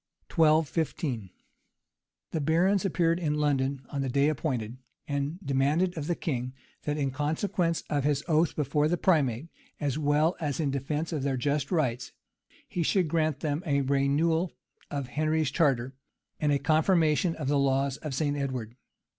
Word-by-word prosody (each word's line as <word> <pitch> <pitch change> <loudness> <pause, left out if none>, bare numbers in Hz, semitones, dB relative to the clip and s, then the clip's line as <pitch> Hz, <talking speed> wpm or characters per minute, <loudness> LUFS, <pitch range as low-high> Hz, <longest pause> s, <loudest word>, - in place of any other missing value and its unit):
{1215.} 155 - +1 1.0
The 160 - -1
barons 180 +7 +2
appeared 170 -2 +2
in 150 -4 0
London 140 -2 0
on 140 - -2
the 135 - -1
day 140 +3 +3
appointed, 130 -6 -2 0.3
and 145 +3 -2
demanded 145 +7 +1
of 155 -2 -4
the 175 - +1
king, 130 -6 -3 0.3
that, 150 0 -1
in 140 -2 0
consequence 160 +4 -1
of 145 -2 0
his 145 0 +1
own 160 -3 +1
oath 165 +1 +2
before 150 +1 +1
the 175 +3 +1
primate, 150 -5 +1 0.3
as 145 -1 -1
well 150 +3 +2
as 150 -3 -2
in 145 -4 0
deference 145 +4 -2
to 155 - -1
their 135 -1 -1
just 140 +2 -1
rights, 130 -8 0 0.5
he 175 - -3
should 175 0 +2
grant 155 -3 0
them 150 0 -1
a 140 -1 +2
renewal 145 +6 +1 0.4
of 140 -3 -4
Henry's 155 0 0
charter, 135 -5 +1 0.5
and 150 -1 +2
a 140 - +3
confirmation 160 +3 +2
of 150 -4 -4
the 145 0 +2
laws 135 0 +1
of 150 -4 -5
St. 145 0 0
Edward. 130 -5 -3
150 Hz, 165 wpm, -28 LUFS, 135-160 Hz, 1.0 s, day